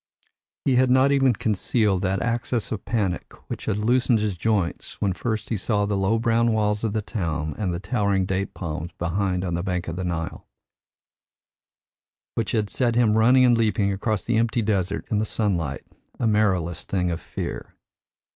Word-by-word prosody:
He 130 -3 +3
had 130 0 +4
not 130 +2 +5
even 135 -2 +4
concealed 105 -2 +1
that 95 0 0
access 115 0 -1
of 110 - -4
panic 100 -7 -1 0.2
which - - -5
had 100 - 0
loosened 120 +2 +3
his 105 -3 -1
joints 100 -2 -1
when 100 -2 +1
first 110 +2 -3
he 110 - 0
saw 105 +1 0
the 100 0 -1
low 95 +3 +2
brown 115 0 +2
walls 105 0 0
of 110 -2 0
the 110 -1 -1
town 80 -7 -2
and 100 -4 -1
the 85 - -3
towering 100 -3 0
date 95 +1 -2
palms 85 -1 -4
behind 90 +2 -1
on 90 - -2
the 85 - -1
bank 90 -1 -2
of 80 +1 -4
the 95 - -2
Nile; 85 -2 -4 1.9
which 115 - -1
had 110 -2 +1
set 120 +1 0
him 115 -3 +4
running 125 +4 +5
and 120 -1 +5
leaping 105 -3 +1
across 100 0 -1
the 120 -1 0
empty 115 0 +1
desert 100 -3 -1
in 105 - +2
the - - +1
sunlight, 85 -11 -1 0.3
a - - 0
marrowless 95 -6 +1
thing 90 -2 -1
of 85 - -4
fear. - - -6
105 Hz, 185 wpm, -24 LUFS, 90-115 Hz, 1.9 s, not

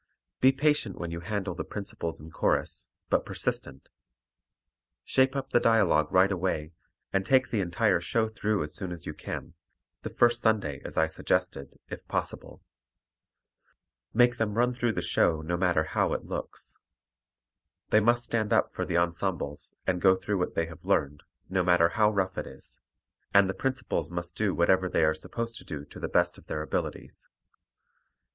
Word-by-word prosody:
Be 130 - +6
patient 140 -7 +1
when 85 -1 -4
you 85 - -4
handle 100 0 -3
the 90 - -4
principals 100 -5 -5
and 80 +2 -12
chorus, - - 0 0.2
but - - +3
persistent. 65 -1 -3 1.2
Shape 130 +1 +3
up 135 -1 -3
the - - +5
dialogue 100 -10 +3
right 95 +2 +5
away, 85 -4 -1 0.4
and 95 - +2
take 130 +4 +3
the 110 - +1
entire 95 +1 +1
show 110 +6 +1
through 110 -2 -1
as 75 - -5
soon 95 -4 -5
as 85 -1 -8
you 75 - -4
can - - -7 0.5
the - - -5
first 120 0 +3
Sunday 100 -11 +1
as - - -6
I 80 - +5
suggested, 75 -3 -2
if - - -7
possible. - - -4 1.5
Make 120 0 +4
them 105 -2 0
run 120 +2 +2
through 120 -2 0
the - - -2
show 80 -2 +2
no 85 +2 -1
matter 85 -3 +2
how 80 - 0
it - - -3
looks. - - -6 1.2
They 110 - +6
must 120 +2 +2
stand 110 -3 -1
up - - +2
for - - -3
the 85 - 0
ensembles 85 -3 -2
and 90 -1 0
go 95 -1 +6
through 100 +1 -2
what 90 - -2
they 85 - +1
have 80 0 -12
learned, 75 +1 0 0.3
no 95 0 +1
matter 90 -2 +4
how 105 +2 +3
rough 95 -3 -1
it - - -5
is, - - -7 0.6
and 100 -1 +7
the 95 - -1
principals 135 -4 -2
must 85 0 -4
do 105 -3 0
whatever 95 +2 +3
they 80 - +2
are 80 0 +4
supposed 115 +9 -5
to - - -11
do 75 -3 -7
to - - -12
the - - -3
best - - +1
of - - -21
their 75 - -3
abilities. - - -4
95 Hz, 180 wpm, -28 LUFS, 85-110 Hz, 1.5 s, and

